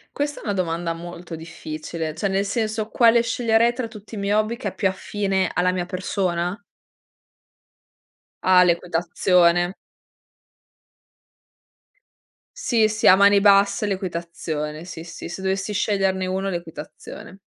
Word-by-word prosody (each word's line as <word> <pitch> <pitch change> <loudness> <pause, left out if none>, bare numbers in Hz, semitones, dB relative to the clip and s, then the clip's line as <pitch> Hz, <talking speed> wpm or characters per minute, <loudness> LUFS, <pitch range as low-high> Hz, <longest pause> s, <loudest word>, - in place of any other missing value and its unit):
Questa 290 0 -2
è - - -13
una 205 - -1
domanda 170 -2 -2
molto 170 0 -8
difficile. 160 0 -6
Cioè 180 +5 -1
nel 195 0 0
senso 215 0 -2
quale 235 0 +5
sceglierei 230 0 +2
tra 240 -2 -4
tutti 220 0 -11
i - - -6
miei 200 0 -1
hobby 215 +2 +1
che 205 - -3
è - - -13
più 190 - +1
affine 190 -1 -1
alla 180 +1 +2
mia 180 -1 -2
persona? 180 0 -2 1.8
Ah, 185 -1 +6
l'equitazione. 175 +1 +2 2.9
Sì, 225 -5 +2
sì. 215 0 -2
A 185 - +9
mani 200 +1 +5
basse 200 +1 +4
l'equitazione. 170 -5 -4
Sì, 170 -2 -8
sì. 170 - -9
Se 190 +2 -7
dovessi 195 +2 -1
sceglierne 195 -2 0
1, 190 +1 -2
l'equitazione. 170 +2 -8
190 Hz, 130 wpm, -22 LUFS, 175-205 Hz, 2.9 s, A